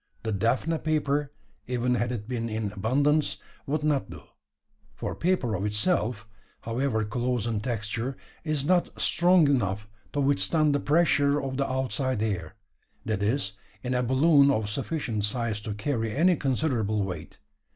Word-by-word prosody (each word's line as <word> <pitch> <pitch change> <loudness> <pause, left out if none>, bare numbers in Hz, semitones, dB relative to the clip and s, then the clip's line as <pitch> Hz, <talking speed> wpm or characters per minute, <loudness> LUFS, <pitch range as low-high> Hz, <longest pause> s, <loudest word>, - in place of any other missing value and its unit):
The 110 - -2
daphne 125 +10 +1
paper 150 -2 0 0.4
even 125 0 0
had 120 0 0
it 110 -4 -4
been 115 -2 -2
in 110 -2 -2
abundance 140 +9 +1 0.3
would 150 +2 -1
not 150 -3 +1
do: - - -10 0.7
for - - -4
paper 165 -10 0
of 95 -1 -2
itself, 105 - 0 0.3
however 115 -1 -1
close 120 +1 -1
in 115 -3 -1
texture, 115 +3 -3 0.3
is 155 -3 -1
not 180 +2 +1
strong 175 -2 +4
enough 105 -7 0 0.3
to 145 - 0
withstand 145 +2 +2
the 145 - +2
pressure 145 -2 +3
of 135 -2 -3
the 140 0 0
outside 130 -3 -1
air 95 -8 -3 0.5
that 110 -3 -1
is, 110 +1 0 0.3
in 125 0 -1
a 125 - +2
balloon 140 +3 +5
of 110 -6 0
sufficient 125 -4 -2
size 110 0 -1
to 105 -1 -4
carry 115 0 -1
any 175 +8 +4
considerable 125 -7 0
weight. 90 -5 -6
125 Hz, 150 wpm, -27 LUFS, 110-145 Hz, 0.7 s, balloon